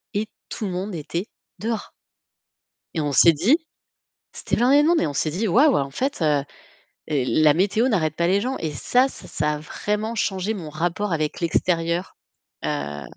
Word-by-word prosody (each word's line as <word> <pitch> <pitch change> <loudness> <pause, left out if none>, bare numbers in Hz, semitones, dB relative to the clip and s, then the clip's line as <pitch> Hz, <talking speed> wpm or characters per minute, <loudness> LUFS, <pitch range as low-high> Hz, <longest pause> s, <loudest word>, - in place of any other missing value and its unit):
et 215 +1 0 0.2
tout 215 - -4
le 190 - -3
monde 185 +1 -4
était 170 +5 -4 0.3
dehors 220 +1 -3 1.0
et 160 - -1
on 145 - -1
s'est 165 +5 +6
dit- 205 - +3 0.8
c'était - - -2
blindé 270 +5 +5
de 305 - +3
monde- 345 -1 +4
et - - +1
on 145 - -4
s'est 155 - 0
dit: 195 +7 -1
«Waouh! 275 - +5
En 140 -1 -1
fait, 265 - -2 0.9
la 150 +2 +3
météo 205 - +2
n'arrête 155 - +1
pas 170 - +1
les 195 +3 +3
gens». 260 +4 -2
Et 160 -2 -2
ça, 250 - +2
ça 150 -9 -3
a 150 - -4
vraiment 210 +8 -3
changé 200 0 -1
mon 170 -7 -6
rapport 175 +5 -2
avec 155 -2 -2
l'extérieur. 170 +1 0 0.5
Heu 75 -1 -3
180 Hz, 175 wpm, -23 LUFS, 155-220 Hz, 1.0 s, s'est